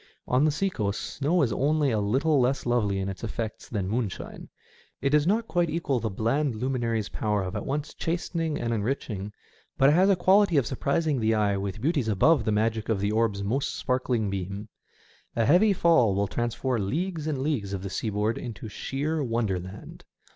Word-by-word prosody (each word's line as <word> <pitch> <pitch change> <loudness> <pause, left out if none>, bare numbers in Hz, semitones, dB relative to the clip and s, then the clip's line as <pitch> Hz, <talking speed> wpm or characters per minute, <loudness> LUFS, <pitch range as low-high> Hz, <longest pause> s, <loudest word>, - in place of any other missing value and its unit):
On 130 +3 +3
the - - +4
sea 190 +6 0
coast, 105 - -2
snow 155 +4 0
is 120 - 0
only 145 0 +2
a 110 - +1
little 135 +9 +2
less 130 +2 +1
lovely 115 -5 +1
in 95 0 -2
its 95 +2 -6
effects 115 -1 -5
than 100 -5 -2
moonshine. 110 -2 -4 0.5
It 140 - 0
does 150 +1 +3
not 225 +4 +1
quite 175 -2 +1
equal 155 -5 0
the 110 - -2
bland 115 +6 0
luminary's 115 -3 -1
power 105 -2 -1
of 90 +2 -5
at 105 - -4
once 145 +2 -3
chastening 165 -2 -2
and 115 0 -1
enriching, 105 -3 -3 0.5
but 135 - +6
it - - +4
has 185 +4 +4
a 195 - +5
quality 185 -1 +4
of 135 - +3
surprising 140 +4 0
the 110 0 +2
eye 105 -2 +2
with 100 +1 -4
beauties 145 -4 +1
above 110 - +3
the 110 - +1
magic 110 +1 0
of 110 -3 +1
the 100 +1 0
orb's 110 -3 +1
most 125 +8 -1
sparkling 125 -5 0
beam. 100 +2 -5 0.7
A 115 - +2
heavy 180 - +5
fall 165 - +4
will 100 +1 +1
transform 120 0 -1
leagues 165 - -2
and 150 -3 -1
leagues 130 -8 -1
of 95 -1 -4
the 100 - -4
seaboard 105 +1 -1
into 115 -3 -7
sheer 145 +8 -2
wonderland. 100 -6 -3
120 Hz, 190 wpm, -27 LUFS, 105-150 Hz, 0.7 s, but